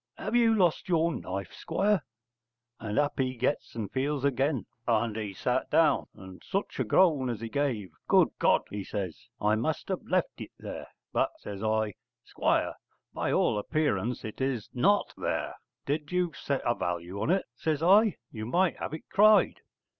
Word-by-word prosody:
have - - -3
you 230 -2 +5
lost 180 -2 +2
your 170 -1 +2
knife, 95 - -5
Squire?' 195 +3 +1 0.8
And 105 -2 -4
up 145 -1 +1
he 130 -1 0
gets 130 +5 -1
and 110 -4 -4
feels 140 +1 -1
again 135 -1 +1 0.2
and 115 -2 +1
he 110 -2 -3
sat 95 - -1
down, - - +3
and 95 -1 -12
such 195 +1 -3
a - - +3
groan 150 -9 +3
as 115 -3 -3
he 115 0 -5
gave. 115 - -1 0.2
'Good - - +5
God!' - - +4
he 100 -1 -4
says, 95 -6 -5
'I 105 +1 +2
must 150 - -2
have 190 - -1
left 185 -1 0
it - - -6
there.' - - -7 0.3
'But,' - - +1
says 100 -1 -7
I, 110 -1 0 0.3
'Squire, - - 0 0.4
by - - -1
all 105 - +2
appearance 125 -4 -1
it 110 +4 -7
is 130 -5 -2
not 200 +11 +2
there. - - -2 0.3
Did 145 +1 -2
you 180 -2 0
set 140 -2 -2
a 120 - +3
value 90 0 -3
on - - 0
it,' 190 +2 +2
says 155 +3 -1
I, 200 +3 +6 0.2
'you 110 -1 -6
might 175 +7 +2
have - - -4
it 160 - -11
cried.' 215 +1 +5
135 Hz, 175 wpm, -29 LUFS, 110-170 Hz, 0.8 s, I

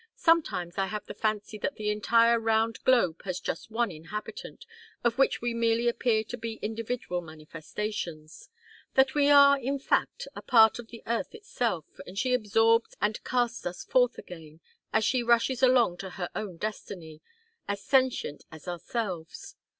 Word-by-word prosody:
Sometimes 205 - +1
I 195 - +1
have 210 +1 -5
the - - -7
fancy 215 -1 -2
that 285 - -2
the 210 -1 -1
entire 230 +2 +3
round 225 0 0
globe 230 -11 +3
has 185 -2 -3
just 180 - -5
one 230 -1 0
inhabitant, 200 - -8 0.4
of 235 +1 +1
which 270 - +2
we 240 -1 0
merely 230 0 +1
appear 235 -2 +1
to 245 +3 -7
be 225 -1 -5
individual 225 -4 -3
manifestations: 160 +1 -7 0.5
that 265 0 +4
we 290 -1 +3
are, 280 -1 +7
in 270 +2 -2
fact, 270 - -1
a - - -7
part 225 -2 +5
of 235 - -8
the 230 -1 -12
earth 235 +4 -2
herself, 240 - -3
and 185 - -10
she 255 +3 +1
absorbs 225 0 +2
and 210 +1 -1
casts 240 -2 -1
us 175 0 -5
forth 250 -1 +2
again, 160 -3 -11 0.3
as 220 0 +2
she 255 -2 +2
rushes 235 +2 +2
along 250 -8 +4
to 190 +1 -6
her 180 -1 -5
own 200 -5 -5
destiny 170 -6 -6 0.5
as 200 0 -3
sentient 260 - +1
as 160 +2 -12
ourselves. 175 -1 -5
225 Hz, 165 wpm, -28 LUFS, 185-240 Hz, 0.5 s, are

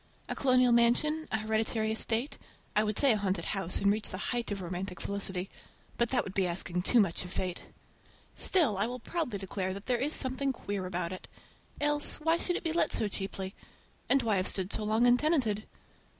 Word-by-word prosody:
A - - -2
colonial 255 -2 +3
mansion, 245 +7 +3
a 220 - +1
hereditary 220 0 0
estate, 225 +5 -1 0.4
I 210 - +4
would 210 -1 -2
say 280 -2 +5
a 220 - +2
haunted 195 -2 -1
house, 195 -3 -1
and 200 0 +3
reach 215 +1 -1
the 185 - -5 0.2
height 240 -1 -2
of 200 - -2
romantic 180 0 -5
felicity—but 200 +4 -4
that 255 - +1
would 195 - -7
be 190 -2 +1
asking 175 0 -2
too 235 +6 +3
much 190 -5 +1
of 180 - -9
fate! 180 -1 -3 0.7
Still 285 - +3
I 205 - +1
will 250 +1 -4
proudly 250 -3 -3
declare 190 -1 -3
that 200 - -8
there 245 -2 0
is 290 +5 +1
something 265 +1 +1
queer 200 -5 -4
about 180 -1 -2
it. 185 - -9 0.5
Else, 295 0 +3
why 325 +2 +2
should 355 - -1
it - - -3
be 325 -2 -1
let 340 - +1
so 215 - +3
cheaply? 195 -1 -4 0.6
And 275 -2 +4
why 215 -3 +2
have 185 - 0
stood 190 0 -2
so - - -1
long 220 +3 +2
untenanted? 245 -5 +2
215 Hz, 200 wpm, -30 LUFS, 190-255 Hz, 0.7 s, say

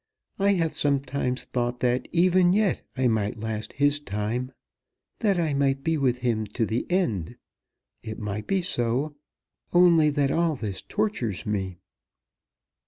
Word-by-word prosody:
I 200 +1 +4
have 165 -4 0
sometimes 140 -3 0
thought 120 0 -2
that 125 0 +1
even 180 +1 +4
yet 205 -2 +2 0.2
I 130 -1 +3
might 110 -2 0
last 110 0 -4
his 145 +1 +2
time 115 +2 -3 0.7
that 200 -5 +2
I 160 -4 0
might 135 -1 +1
be 165 +1 +1
with 130 -5 +1
him 110 -3 0
to 115 - +1
the 110 +3 -2
end. 160 - 0 0.7
It 110 - -6
might 105 0 -4
be 195 -2 +1
so, 130 +1 0 0.6
only 170 -3 +6
that 145 -2 +1
all 165 -2 +1
this 105 -7 -4
tortures 205 - -2
me." 95 -4 -2
135 Hz, 145 wpm, -26 LUFS, 110-165 Hz, 0.7 s, only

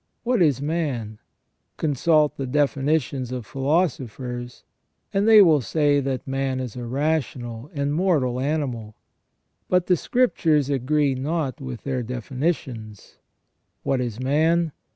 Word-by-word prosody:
What 240 -4 +1
is 140 -5 +3
man? 135 -9 -2 0.6
Consult 150 +1 +2
the 135 - -4
definitions 140 -1 0
of 125 -3 -4
philosophers, 130 - -2 0.5
and 200 +2 +2
they 215 -2 +9
will 155 -6 +4
say 145 +1 +2
that 135 -1 -3
man 135 -1 -1
is 125 -4 -5
a 120 -1 -5
rational 130 -3 -2
and 140 -2 -1
mortal 150 -8 +1
animal. 130 -7 -2 0.7
But 180 -1 +3
the 180 - +4
Scriptures 160 - +1
agree 140 +2 +1
not 145 +2 -2
with 130 -3 -7
their 130 -2 -2
definitions. 125 - -4 0.6
What 135 -2 0
is 120 -2 -4
man 160 +5 +2
140 Hz, 125 wpm, -23 LUFS, 125-155 Hz, 0.7 s, they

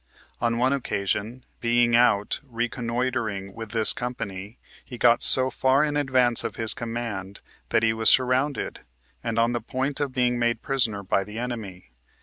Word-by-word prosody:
On 115 -1 0
one 130 +3 +2
occasion, 110 -1 -3
being 120 0 +3
out 110 -4 +3
reconnoitering 120 -4 -3
with 115 0 -8
this 110 -1 +3
company, 105 -4 -6 0.3
he 125 - -9
got 120 0 +4
so 130 0 +4
far 135 +2 +3
in 150 -1 -1
advance 130 -4 +2
of - - -4
his 115 -1 -1
command 115 -6 -5 0.3
that 115 - +2
he 110 0 +3
was 110 0 +3
sur 130 -1 +5
rounded, 130 +3 -1 0.4
and 115 -1 -3
on 115 +1 +3
the 120 -1 -2
point 130 +4 -3
of 145 -2 -1
being 125 -1 +1
made 120 -1 0
prisoner 115 -7 0
by 95 +1 +1
the 105 +2 -9
enemy. 110 - -6
120 Hz, 165 wpm, -25 LUFS, 110-130 Hz, 0.4 s, sur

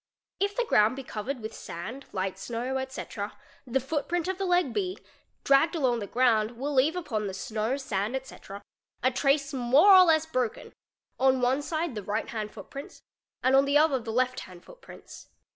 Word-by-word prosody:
If 400 +1 0
the - - 0
ground 215 - +3
be 270 - -7
covered 245 +3 -5
with 220 +1 -6
sand, 215 +11 -8
light 190 -1 -3
snow, 245 +3 -3
etc., 265 +1 -6 0.3
the 260 +2 +1
footprint 315 +5 -2
of 375 0 -3
the 390 - -1
leg 355 -8 +2
B 370 -2 -2 0.5
dragged 280 +5 +4
along 255 -7 +1
the 205 - -5
ground 230 -2 +2
will 285 +4 -3
leave 280 +5 +3
upon 240 - -3
the 190 - -5
snow, 220 +6 -2
sand, 220 -3 -2
etc., 260 -6 -8 0.4
a 255 - +3
trace 275 +2 +1
more 270 +10 +5
or 370 -1 +9
less 320 -2 +3
broken, 255 -8 -3 0.5
on 265 0 +4
one 255 +3 +2
side 315 0 -2
the 210 - -5
right 210 +3 -3
hand 215 -2 -4
footprints 250 +7 -10 0.4
and 260 +1 +4
on 275 +1 +5
the 285 +1 +3
other 300 -3 +3
the 225 -1 -6
left 255 +2 0
hand 180 -2 -12
footprints. - - -13
260 Hz, 185 wpm, -28 LUFS, 225-295 Hz, 0.5 s, or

